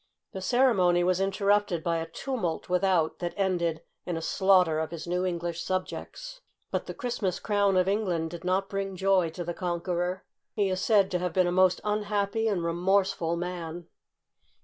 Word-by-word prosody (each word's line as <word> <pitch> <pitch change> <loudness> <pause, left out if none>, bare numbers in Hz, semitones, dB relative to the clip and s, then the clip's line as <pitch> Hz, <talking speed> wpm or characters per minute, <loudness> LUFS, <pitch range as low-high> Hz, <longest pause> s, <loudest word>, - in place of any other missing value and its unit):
The 190 - -6
ceremony 190 -7 +3
was 185 +1 +1
interrupted 200 -3 +1
by 170 -1 0
a 165 0 -3
tumult 185 -5 -3
without 180 -3 +1
that 175 -1 -4
ended 175 -5 0 0.2
in 175 -2 -3
a - - -4
slaughter 185 -5 +3
of 160 - -2
his 165 -1 -7
new 180 +1 -1
English 170 -1 -3
subjects. - - -5 0.3
But - - -2
the - - -6
Christmas 230 -8 -2
crown 200 -2 +2
of 185 0 +3
England 185 -6 0
did 175 - -8
not 185 +2 0
bring 195 -1 -3
joy 190 -2 +2
to 175 +2 -6
the 175 0 -4
Conqueror. 180 +1 -2 0.3
He 205 -2 +1
is 185 0 -1
said 200 -3 +3
to 180 - 0
have 180 -1 -2
been 185 0 +3
a 175 - 0
most 185 0 +3
unhappy 210 +1 0
and 195 -6 0
remorseful 175 0 +1
man. 175 -1 -5
185 Hz, 175 wpm, -28 LUFS, 175-195 Hz, 0.3 s, ceremony